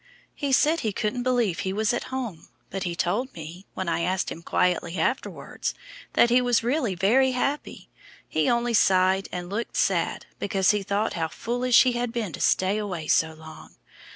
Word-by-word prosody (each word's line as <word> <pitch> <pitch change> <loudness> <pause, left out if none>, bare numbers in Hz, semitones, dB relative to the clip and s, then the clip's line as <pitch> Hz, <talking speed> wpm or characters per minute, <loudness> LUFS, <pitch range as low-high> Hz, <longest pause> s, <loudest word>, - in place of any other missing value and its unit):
He 285 -1 -3
said 310 +5 +4
he 220 - -1
couldn't 215 +5 -2
believe 240 -9 +1
he 190 - -2
was 215 +3 +1
at 240 - -2
home, 245 -10 -5 0.2
but 195 - -4
he 175 -2 -2
told 205 +10 -1
me, 170 +4 -9
when 190 - -3
I 170 - 0
asked 185 +2 -1
him 165 - -7
quietly 180 0 0
afterwards, 255 +11 -2 0.4
that 235 - +4
he 250 +1 +5
was 245 -2 +2
really 245 -5 0
very 250 +9 +3
happy, 275 +4 -3 0.4
he 155 -1 +1
only 235 0 +1
sighed 190 -2 +3
and 175 -1 -5
looked 210 +5 -4
sad - - 0
because 195 -2 +2
he 210 -1 0
thought 205 +2 -1
how 165 -2 -1
foolish 240 - +3
he 255 - +2
had 240 -1 -2
been 225 -8 -3
to - - -6
stay 190 +3 +2
away 185 -7 -4
so 160 +1 +2
long. 160 0 -13
205 Hz, 185 wpm, -25 LUFS, 180-245 Hz, 0.4 s, he